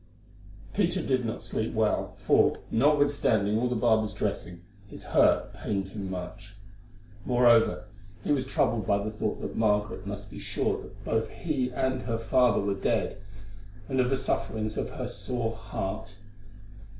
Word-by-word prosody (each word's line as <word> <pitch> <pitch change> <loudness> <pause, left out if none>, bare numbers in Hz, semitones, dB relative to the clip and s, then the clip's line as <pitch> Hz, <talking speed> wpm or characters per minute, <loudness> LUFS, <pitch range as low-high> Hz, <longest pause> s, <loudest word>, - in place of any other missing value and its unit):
Peter 185 -2 +1
did 130 -5 0
not 115 +1 -4
sleep 110 +1 -2
well, 110 -1 +1
for, - - +3
notwithstanding 135 -6 +3
all 125 +1 +1
the 125 - -1
barber's 110 -2 +2
dressing, 90 0 -3 0.2
his - - -10
hurt - - +3
pained 95 -2 -3
him 95 -1 -5
much. 105 +3 -7 0.7
Moreover, 120 -2 +4 0.4
he - - -1
was 135 -3 +1
troubled 115 -6 +1
by 100 - +4
the 110 - -3
thought 110 - -2
that - - -5
Margaret 105 -1 +1
must - - -6
be - - -8
sure - - -1
that - - -13
both 110 0 0
he 135 -6 -2
and 130 +1 -1
her 115 -2 -2
father 120 0 +3
were 100 0 0
dead, 100 0 -1 0.7
and 130 -1 -1
of 125 -1 +3
the 135 - +2
sufferings 110 -2 -2
of - - -2
her - - -5
sore 120 -3 -3
heart. 95 -4 -5
115 Hz, 155 wpm, -28 LUFS, 105-125 Hz, 0.7 s, Moreover